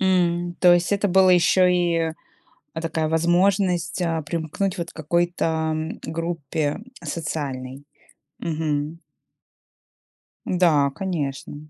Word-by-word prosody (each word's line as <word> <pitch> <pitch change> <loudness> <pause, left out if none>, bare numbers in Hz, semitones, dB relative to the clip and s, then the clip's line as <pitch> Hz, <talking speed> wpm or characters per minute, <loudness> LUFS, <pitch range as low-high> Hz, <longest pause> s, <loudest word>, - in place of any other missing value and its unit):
М, 175 -2 +1
то 180 -1 +7
есть 175 +3 +2
это 205 0 +1
была 185 0 +5
ещё 180 +1 +4
и 170 -2 +1 0.6
эдакая 160 -1 -2
возможность, 175 +2 +2
э, 165 -2 0
примкнуть 170 +5 -2
вот 170 0 -4
к - - -24
какой-то 160 -1 0 0.2
группе 160 -1 -2 0.2
социальной? 145 -4 -4 0.6
Мгм. 155 0 -2 1.5
Да, 160 -6 +3
конечно. 145 -5 -4
165 Hz, 100 wpm, -23 LUFS, 155-180 Hz, 1.5 s, то